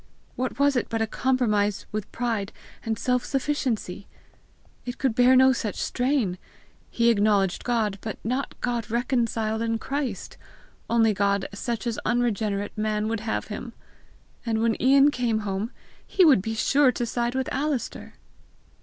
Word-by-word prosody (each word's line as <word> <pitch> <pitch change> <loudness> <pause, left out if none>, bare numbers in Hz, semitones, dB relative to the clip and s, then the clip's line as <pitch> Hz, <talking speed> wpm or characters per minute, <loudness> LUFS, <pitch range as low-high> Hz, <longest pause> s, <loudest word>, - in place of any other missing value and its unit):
What 255 -1 -3
was 280 0 +3
it 245 - 0
but 225 -1 0
a - - +1
compromise 215 -5 0
with 210 -1 -4
pride 225 -4 -2 0.3
and 220 -1 -2
self 250 +2 0
sufficiency! 260 -9 -2 0.8
It 245 +1 -6
could 265 -4 0
bear 250 +2 +5
no 260 0 +6
such 220 -4 -3
strain! 245 -8 0 0.5
He 235 0 +3
acknowledged 205 -4 +2
God, 220 -5 0
but 220 - -5
not 255 +5 -3
God 240 -3 -2
reconciled 230 -2 0
in 225 0 0
Christ, 265 -5 -4 0.5
only 225 -2 +4
God 200 0 +1
such 230 +3 -3
as 235 -2 -2
unregenerate 215 -4 0
man 215 0 -1
would 225 -1 -1
have 220 +1 -3
him! 230 +3 -6 0.7
And 225 -2 -1
when 230 -1 +1
Ian 275 +3 +6
came 235 -5 0
home, 200 +2 -2 0.3
he 375 - +3
would 275 - +6
be 225 +3 -3
sure 270 +4 +4
to 240 - -2
side 240 +1 -2
with 265 0 -1
Alister! 275 -3 -3
230 Hz, 155 wpm, -25 LUFS, 215-255 Hz, 0.8 s, no